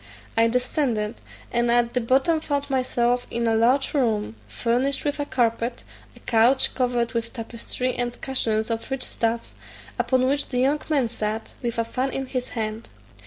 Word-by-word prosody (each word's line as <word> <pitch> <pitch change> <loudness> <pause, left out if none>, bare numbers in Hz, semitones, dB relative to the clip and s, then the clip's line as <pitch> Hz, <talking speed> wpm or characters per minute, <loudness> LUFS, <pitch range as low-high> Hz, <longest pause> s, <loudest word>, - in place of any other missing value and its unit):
I 225 0 +5
descended, 240 -3 0 0.3
and 240 0 +2
at 235 0 +3
the 250 - +1
bottom 270 +7 +3
found 285 -2 -2
myself 245 -2 +1
in 235 0 -1
a 225 - +3
large 245 +5 +3
room, 220 - +1
furnished 245 - 0
with 290 0 -1
a 290 - -1
carpet, 235 0 0 0.3
a - - -15
couch 240 +3 +3
covered 245 -2 0
with 230 -1 -2
tapestry, 235 +2 -3
and 245 0 -2
cushions 225 -4 0
of 225 0 -3
rich 270 -1 -1
stuff, 230 0 -1 0.5
upon 255 -1 +2
which 280 +2 +1
the 250 - -2
young 275 +4 +3
man 280 -6 +2
sat, 220 -1 -4
with 235 -2 -2
a 230 - +1
fan 255 +3 -1
in 270 0 -3
his 255 -1 -3
hand. 220 0 -3
240 Hz, 170 wpm, -24 LUFS, 230-265 Hz, 0.5 s, I